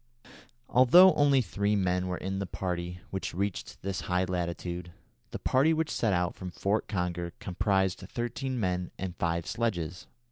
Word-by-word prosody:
Although 175 +10 +7
only 140 -3 +4
three 100 +2 0
men 90 -2 +1
were 90 0 -2
in 95 +1 -3
the 100 - -3
party 90 -1 -4
which 95 -3 -4
reached 100 +1 -3
this 95 0 -2
high 90 0 0
latitude, 85 -1 -3 0.4
the - - -5
party 140 +5 +3
which 160 0 0
set 115 - +1
out 90 -1 +1
from 95 - -7
Fort 100 +4 -1
Conger 90 -3 -2
comprised 95 0 0
thirteen 120 +6 -3
men 90 -3 -1
and 90 -2 -4
five 85 -1 -1
sledges. 90 -6 -2
95 Hz, 155 wpm, -29 LUFS, 90-110 Hz, 0.4 s, Although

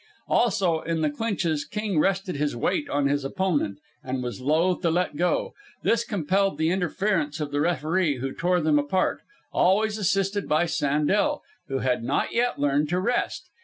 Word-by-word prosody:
Also, 190 -8 +2
in 165 -1 -2
the 155 -2 +1
clinches 170 -5 -1
King 210 -6 -2
rested 195 +1 0
his 145 -1 -1
weight 285 - -1
on 145 -1 0
his 145 0 0
opponent, 145 - -1 0.3
and 130 0 -3
was 125 +1 -5
loath 160 +7 +2
to 170 - +2
let 175 -1 0
go. 175 +3 0 0.3
This 230 0 +2
compelled 195 -2 0
the 160 +1 +1
interference 180 -4 0
of 150 -2 -3
the 145 0 0
referee, 165 -1 +1
who 135 +2 -4
tore 180 +1 +1
them 155 -1 +3
apart, 145 +6 0 0.3
always 210 +4 +2
assisted 195 0 0
by 155 +3 +3
Sandel, 165 - +1 0.2
who 135 -2 -2
had 125 -2 +1
not - - -1
yet 245 +1 +1
learned 145 +1 +1
to 180 +2 +1
rest. 240 +6 -1
170 Hz, 170 wpm, -25 LUFS, 145-195 Hz, 0.3 s, them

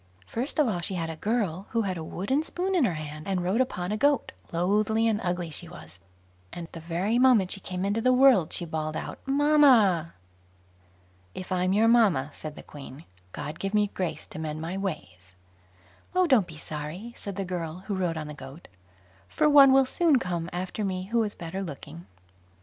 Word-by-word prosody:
First 245 - -3
of 300 -4 +4
all, 195 -6 -1
she 180 +3 -3
had 165 -2 -2
a - - -6
girl 200 -1 -1
who 230 -1 0
had 190 -2 -2
a 165 - -5
wooden 200 - -1
spoon 360 +4 -3
in 340 -8 +3
her 180 - 0
hand, 155 0 -7
and 190 -2 -1
rode 195 +8 +1
upon 180 -7 -2
a 215 - 0
goat; 285 +1 +2 0.2
loathly 210 +6 +1
and 220 -1 +1
ugly 175 -2 -2
she 165 +2 -6
was, 90 - -12 0.5
and 170 -1 -7
the 165 - -8
very 175 +8 -1
moment 245 -8 +4
she - - -2
came 185 0 -4
into 205 +3 0
the 255 +2 +4
world, 250 - +5
she 175 - -1
bawled 155 -1 -3
out - - -5
"Mamma". 270 - +4 1.2
"If 185 - -7
I'm 185 0 +1
your 215 +3 +4
mamma", 200 - +4
said 155 -1 -7
the - - -10
Queen, 145 +1 -11 0.3
"God 150 - -6
give 195 +2 -2
me 205 -1 +2
grace 180 -3 -3
to - - -9
mend 155 -1 -4
my 165 +3 -4
ways." 95 - -6 0.8
"Oh, 365 0 +4
don't 255 - +4
be 160 - -11
sorry", 155 +10 -7
said 200 -2 -7
the 195 0 -3
girl, 175 -1 -5
who 205 - -3
rode 180 -4 -1
on 155 - -4
the 150 - -7
goat, 135 +3 -11 0.6
"for - - +2
one 280 -2 +8
will 270 0 +6
soon 305 +2 +3
come 175 -6 -3
after 185 +4 -4
me 185 -2 -2
who 235 0 +3
is 210 -2 -2
better 170 +3 -5
looking." 125 - -8
185 Hz, 200 wpm, -27 LUFS, 165-225 Hz, 1.2 s, one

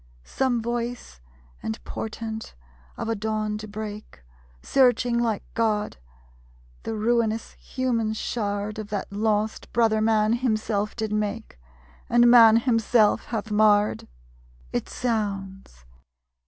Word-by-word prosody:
Some 245 -4 0
voice 235 - -4 0.4
and 110 - -3
portent 220 - -6 0.4
of - - -4
a 225 - +1
dawn 215 0 -2
to 215 - -7
break? 210 - -8 0.4
Searching 245 -2 +3
like 225 -4 0
God, 215 -2 0 0.8
the 225 - -4
ruinous 225 0 0
human 235 -4 -2
shard 210 -1 -3
Of 210 -1 -6
that 205 -1 -4
lost 215 +1 -1
Brother 225 -2 +2
man 220 0 +3
Himself 215 -3 -1
did 220 -2 -3
make, 210 - -3 0.5
And 240 0 +5
Man 230 -2 +8
himself 230 -2 +2
hath 220 -2 -4
marred? 210 0 +3 0.7
It - - -2
sounds! 195 - -4
220 Hz, 115 wpm, -25 LUFS, 210-230 Hz, 0.8 s, Man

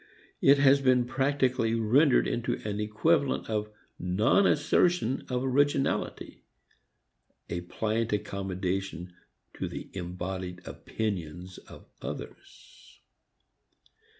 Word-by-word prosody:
It 140 +1 +6
has 140 0 +5
been 130 -2 +3
practically 130 -3 +1
rendered 125 +6 +4
into 120 - -1
an 105 0 -3
equivalent 135 +8 +1
of 105 -1 -1 0.3
non 105 - +3
assertion 170 -8 +2
of 125 0 -1
originality, 135 +1 0 1.1
a 85 - -2
pliant 110 +5 -2
accommodation 95 -3 -3 0.4
to - - -4
the - - -7
embodied 90 0 -5
opinions 90 +3 -5
of - - -14 0.2
others. - - -10
110 Hz, 95 wpm, -28 LUFS, 95-135 Hz, 1.1 s, It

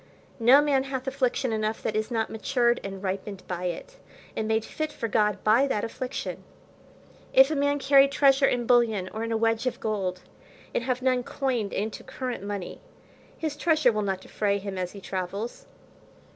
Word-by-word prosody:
No 250 +5 +7
man 275 -2 +2
hath 265 -1 -4
affliction 260 -2 0
enough 215 0 -2
that 215 - -2
is 215 0 -1
not 225 -2 -1
matured 240 +2 +1
and 195 0 -6
ripened 195 0 -4
by 180 0 -4
it, - - -5 0.4
and 220 - -2
made 220 0 +1
fit 310 -1 -4
for 230 - -4
God 210 -3 +1
by 230 +6 +4
that 210 -6 -1
affliction. 250 +2 -5 0.9
If 265 +3 +7
a - - 0
man 285 0 +2
carry 275 0 +6
treasure 275 -1 +4
in 240 -1 0
bullion, 225 -6 +3
or 220 +1 -3
in 230 - -3
a 225 - +1
wedge 225 +2 +1
of 255 - -2
gold, 190 -4 -2 0.5
and 235 - -1
have 255 -1 -1
none 255 -1 +2
coined 245 -5 -2
into 210 +2 -3
current 250 -6 -5
money, 200 -3 -5 0.6
his 310 -2 -3
treasure 310 -4 +3
will 215 -1 -1
not 195 -2 -2
defray 200 +1 -1
him 200 -1 -5
as 180 -1 -3
he 200 - -10
travels. 195 +5 -5
230 Hz, 185 wpm, -27 LUFS, 205-265 Hz, 0.9 s, No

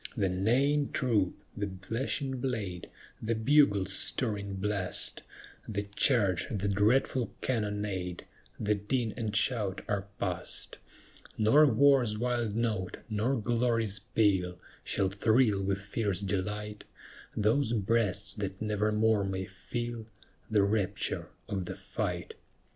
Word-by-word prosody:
The 100 -3 +2
neighing 130 +10 +2
troop, 110 -8 +1 0.2
the 100 -1 -2
flashing 130 +7 -2
blade, 105 -9 -3 0.3
The 115 +1 0
bugle's 110 -6 +3
stirring 100 -3 +2
blast, 100 -1 -2 0.5
The 100 -2 -2
charge, 105 - +3
the 100 -2 -2
dreadful 110 +5 +2
cannonade, 105 -6 -2 0.3
The 105 0 +2
din 110 +3 -1
and 110 -3 -3
shout 105 -4 +1
are 100 -1 -1
past; 90 -2 -4 0.6
Nor 125 +8 +6
war's 130 -3 +4
wild 120 -2 -1
note, 110 -5 -1
nor 110 +6 +1
glory's 115 -2 +1
peal, 95 -5 +1 0.3
Shall 95 - +1
thrill 105 +1 +3
with 95 0 0
fierce 100 -2 -1
delight 105 +2 -3 0.5
Those 110 +4 +2
breasts 105 -2 +1
that 100 -2 -4
nevermore 105 0 +2
may 95 -1 -2
feel 120 +4 -5 0.4
The 105 -3 +4
rapture 100 -1 0 0.2
of 95 -3 -2
the - - -5
fight. - - -4
105 Hz, 115 wpm, -30 LUFS, 100-115 Hz, 0.6 s, Nor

